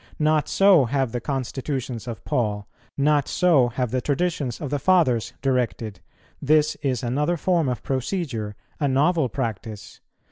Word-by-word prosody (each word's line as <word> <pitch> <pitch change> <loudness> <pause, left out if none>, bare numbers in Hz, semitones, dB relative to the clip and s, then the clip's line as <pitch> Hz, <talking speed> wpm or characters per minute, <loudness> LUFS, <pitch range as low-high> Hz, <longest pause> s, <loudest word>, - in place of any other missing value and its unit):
Not 155 0 +2
so 195 -8 +5
have 135 0 0
the 120 0 -3
constitutions 130 -2 -4
of 115 -3 -7
Paul, 105 -3 -1 0.3
not 145 0 +2
so 160 -9 +3
have 125 -1 -2
the 130 - 0
traditions 145 -3 -1
of 145 - -5
the 145 - 0
Fathers 145 -11 +2
directed; 120 -6 -1 0.4
this 150 +1 +3
is 130 -5 -1
another 150 +8 0
form 170 -4 +1
of 125 - -4
procedure, 130 - -3 0.2
a 145 - +1
novel 140 +1 +2
practice. 110 -4 -5
135 Hz, 145 wpm, -23 LUFS, 120-150 Hz, 0.4 s, so